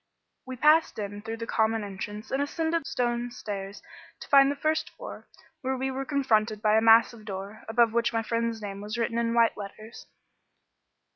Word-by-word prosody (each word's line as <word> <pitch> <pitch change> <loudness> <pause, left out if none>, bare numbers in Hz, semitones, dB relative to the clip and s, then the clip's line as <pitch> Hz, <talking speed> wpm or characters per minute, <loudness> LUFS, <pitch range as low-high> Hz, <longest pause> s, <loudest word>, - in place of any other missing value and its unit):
We 260 - -5
passed 305 +5 +4
in 205 -1 -5
through 225 +1 -5
the 230 - -5
common 220 -1 +1
entrance 205 +2 -7
and 270 - 0
ascended 325 +3 -1
the - - -5
stone 240 -1 -1
stairs 200 -4 -7 0.4
to - - -9
the 275 0 +6
first 310 +1 0
floor, - - -10 0.3
where 265 -1 -1
we 265 +1 -2
were 270 +1 -4
confronted 225 -7 +1
by 215 0 +3
a 220 - +4
massive 225 0 +5
door, 200 +1 -7
above 225 0 +3
which 235 0 +1
my 225 -1 -1
friend's 230 -1 -2
name 200 -1 -6
was 210 +2 -5
written 235 0 -1
in 230 0 0
white 230 -1 +4
letters. 215 +2 -10
230 Hz, 185 wpm, -27 LUFS, 215-260 Hz, 0.4 s, the